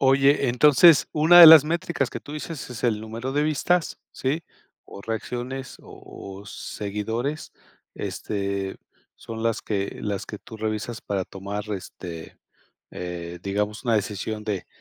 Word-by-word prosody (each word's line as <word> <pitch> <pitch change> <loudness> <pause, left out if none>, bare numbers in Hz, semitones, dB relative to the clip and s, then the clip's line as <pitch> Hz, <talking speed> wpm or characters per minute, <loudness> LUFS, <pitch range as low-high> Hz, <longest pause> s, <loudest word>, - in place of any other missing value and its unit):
Oye, 135 0 +4
entonces 145 +3 +6
una 160 +3 +7
de 170 - +13
las 155 -2 +10
métricas 170 -4 -1
que - - -6
tú 145 - -11
dices 150 -3 -6
es 125 0 -6
el 110 -3 +1
número 115 +4 -5
de 145 +1 +1
vistas, 155 +3 0
¿sí? 145 +6 -2 0.4
O - - -11
reacciones 125 +4 -5
o 95 -1 -11
o 100 - -14
seguidores, 110 +10 -4 0.4
este, 100 -1 -4 0.4
son 115 0 -7
las 115 -1 0
que 100 -2 -3
las 100 -1 -3
que 105 - -8
tú 110 - -12
revisas 110 +1 -4
para 95 -2 -2
tomar, 100 +2 -6
este, 85 -3 -8 0.5
eh, 90 -1 -6
digamos, 105 +4 -2
una 115 -2 +2
decisión 105 +1 -2
de 105 -4 -4
110 Hz, 145 wpm, -24 LUFS, 100-140 Hz, 0.5 s, de